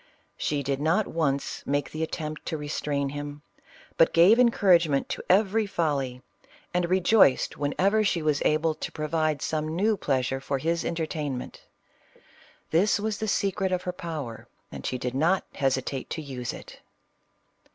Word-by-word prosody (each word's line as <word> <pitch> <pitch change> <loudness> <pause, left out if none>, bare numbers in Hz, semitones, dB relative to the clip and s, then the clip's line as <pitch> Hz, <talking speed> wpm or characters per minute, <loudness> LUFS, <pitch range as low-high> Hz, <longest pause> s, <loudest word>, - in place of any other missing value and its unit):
She 145 -1 -1
did 135 +1 -2
not 170 +8 +2
once 140 -4 -1
make 145 +1 -1
the 155 - -5
attempt 155 -1 -4
to 160 - -2
restrain 145 -1 -2
him, 145 +1 -7 0.5
but 165 - +4
gave 185 +8 +6
encourage 190 -8 +5
ment 140 -1 0
to - - -3
every 210 +3 +3
folly, 140 -9 -1 0.5
and 175 -1 0
rejoiced 185 -5 +4
whenever 195 +9 +2
she 175 -6 0
was 150 -2 +2
CLEOPATRA. - - +3
41 - - +2
able 155 +1 +1
to - - -6
provide 155 -1 -1
some 155 -1 -1
new 210 +5 +2
pleasure 135 - -1
for 135 +1 -2
his 165 +4 -1
entertain 155 -5 -2
ment 125 - -9 1.1
This 190 +6 +3
was 215 0 -2
the 220 - -2
secret 195 -1 0
of 180 -1 -1
her 180 - -3
power, 155 -10 -6 0.2
and - - -8
she 130 - -2
did 125 0 -3
not 165 +8 +2
hesitate 135 -1 -1
to 160 - -4
use 130 -4 -5
it. - - -11
155 Hz, 165 wpm, -26 LUFS, 140-180 Hz, 1.1 s, gave